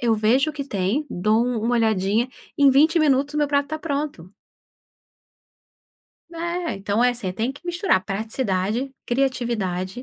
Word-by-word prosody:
eu 230 Hz, -2 st, +2 dB
vejo 245 Hz, +8 st, +2 dB
o -, -, -12 dB
que 285 Hz, -2 st, -5 dB
tem, 215 Hz, +6 st, -1 dB
dou 215 Hz, +6 st, +2 dB
uma 240 Hz, -1 st, 0 dB
"olhadinha," 220 Hz, +1 st, +1 dB, 0.3 s
em 280 Hz, -1 st, +6 dB
20 310 Hz, +5 st, +4 dB
minutos 285 Hz, -1 st, +2 dB
o -, -, 0 dB
meu 295 Hz, -1 st, +2 dB
prato 285 Hz, -1 st, +2 dB
está 310 Hz, +2 st, -5 dB
pronto. 280 Hz, -, -4 dB, 2.0 s
Eh, 340 Hz, +1 st, -3 dB
então 200 Hz, +4 st, -1 dB
é, 250 Hz, -, +5 dB
assim, 230 Hz, -7 st, -3 dB
tem 220 Hz, +7 st, -1 dB
que 280 Hz, +5 st, -13 dB
misturar 350 Hz, -, +1 dB
praticidade, 215 Hz, +3 st, -2 dB
criatividade, 235 Hz, -6 st, -1 dB
245 Hz, 150 wpm, -23 LUFS, 210-285 Hz, 2.0 s, em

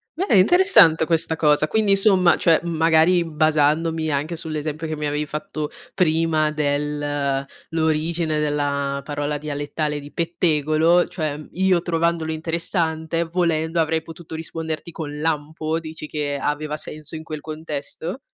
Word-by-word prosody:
Beh 335 Hz, -, +2 dB
interessante 190 Hz, -, +6 dB
questa 160 Hz, 0 st, 0 dB
cosa, 150 Hz, -1 st, +3 dB
quindi 215 Hz, +3 st, +1 dB
insomma, 195 Hz, -3 st, +5 dB
cioè, 165 Hz, -2 st, +3 dB
uhm, 170 Hz, -, -3 dB
magari 165 Hz, +2 st, +4 dB
basandomi 155 Hz, +1 st, +1 dB
anche 150 Hz, +4 st, -2 dB
sull'esempio 155 Hz, 0 st, -4 dB
che 155 Hz, -, -3 dB
mi 150 Hz, -, -4 dB
avevi 150 Hz, +1 st, -1 dB
fatto 150 Hz, -1 st, -4 dB, 0.3 s
prima 160 Hz, -2 st, +2 dB
del 145 Hz, -2 st, -1 dB, 0.3 s
l'origine 160 Hz, 0 st, 0 dB
della 140 Hz, -2 st, -1 dB
parola 145 Hz, 0 st, -3 dB
dialettale 150 Hz, 0 st, -3 dB
di 145 Hz, 0 st, -11 dB
pettegolo, 165 Hz, 0 st, +2 dB
cioè 155 Hz, -4 st, -3 dB
io 185 Hz, -1 st, +2 dB
trovandolo 165 Hz, -1 st, 0 dB
interessante, 165 Hz, 0 st, -1 dB
volendo 165 Hz, -1 st, 0 dB
avrei 160 Hz, 0 st, +1 dB
potuto 165 Hz, 0 st, -9 dB
risponderti 160 Hz, 0 st, -5 dB
con 150 Hz, -2 st, -6 dB
"lampo", 155 Hz, +1 st, -1 dB
dici 160 Hz, -1 st, -8 dB
che 145 Hz, -2 st, -2 dB
aveva 150 Hz, +1 st, -2 dB
senso 155 Hz, +1 st, -7 dB
in 160 Hz, -, -7 dB
quel 155 Hz, -2 st, -6 dB
contesto? 155 Hz, -, -6 dB
160 Hz, 135 wpm, -22 LUFS, 150-165 Hz, 0.3 s, interessante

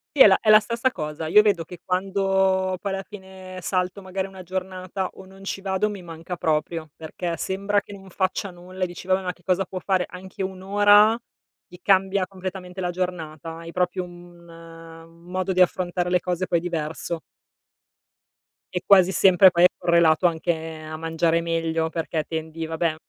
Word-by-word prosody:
Sì, 275 Hz, -, +9 dB
è -, -, +9 dB
la 190 Hz, -, +5 dB
è 215 Hz, -, 0 dB
la 215 Hz, 0 st, +9 dB
stessa 235 Hz, +4 st, -1 dB
cosa. 150 Hz, -2 st, -5 dB
Io 210 Hz, +6 st, +7 dB
vedo 200 Hz, -6 st, +2 dB
che 175 Hz, +1 st, -11 dB
quando 190 Hz, 0 st, +1 dB
poi 200 Hz, -, -2 dB
alla 195 Hz, 0 st, -3 dB
fine 190 Hz, -2 st, -10 dB
salto, 180 Hz, +2 st, -1 dB
magari, 190 Hz, 0 st, -3 dB
una 190 Hz, -1 st, -11 dB
giornata, 185 Hz, +1 st, -4 dB
o 190 Hz, -, -12 dB
non 195 Hz, +1 st, -15 dB
ci 195 Hz, 0 st, -4 dB
vado, 195 Hz, +2 st, 0 dB
mi 205 Hz, -2 st, -7 dB
manca 170 Hz, +1 st, -7 dB
proprio, 155 Hz, 0 st, -1 dB
perché 165 Hz, +2 st, -4 dB
sembra 200 Hz, +2 st, 0 dB
che 205 Hz, -, -12 dB
non 195 Hz, -1 st, -12 dB
faccia 190 Hz, +2 st, -1 dB
nulla 185 Hz, +1 st, -7 dB
e -, -, +1 dB
dici: 175 Hz, 0 st, -10 dB
"Vabbè, 190 Hz, 0 st, +2 dB
ma 180 Hz, -1 st, -3 dB
che 175 Hz, -, -27 dB
cosa 185 Hz, +2 st, +1 dB
può 185 Hz, +1 st, -6 dB
fare?" 185 Hz, -1 st, +1 dB
Anche 185 Hz, +1 st, -9 dB
1 190 Hz, -1 st, -4 dB
ora, 205 Hz, +2 st, +6 dB, 0.5 s
ti 180 Hz, -, -14 dB
cambia 195 Hz, 0 st, +3 dB
completamente 185 Hz, -1 st, -7 dB
la 180 Hz, -, -1 dB
giornata, 165 Hz, -3 st, -4 dB
hai 165 Hz, 0 st, -9 dB
proprio 180 Hz, +1 st, -1 dB
un 175 Hz, -1 st, -14 dB
un 165 Hz, 0 st, -13 dB
modo 185 Hz, +1 st, -1 dB
di 185 Hz, -, +3 dB
affrontare 180 Hz, 0 st, +1 dB
le 180 Hz, 0 st, +3 dB
cose 180 Hz, +1 st, -2 dB
poi 170 Hz, -, +2 dB
diverso. 165 Hz, 0 st, -4 dB, 1.5 s
E 180 Hz, -, -1 dB
quasi 190 Hz, -2 st, +6 dB
sempre, 190 Hz, 0 st, +7 dB
poi 175 Hz, -1 st, +2 dB
è -, -, +10 dB
correlato 170 Hz, 0 st, +4 dB
anche 170 Hz, +1 st, 0 dB, 0.3 s
a 155 Hz, 0 st, -7 dB
mangiare 165 Hz, +1 st, +1 dB
meglio, 165 Hz, -1 st, -1 dB
perché 160 Hz, -1 st, -3 dB
tendi 160 Hz, 0 st, -4 dB
vabbè, 160 Hz, 0 st, -1 dB
180 Hz, 185 wpm, -24 LUFS, 165-190 Hz, 1.5 s, è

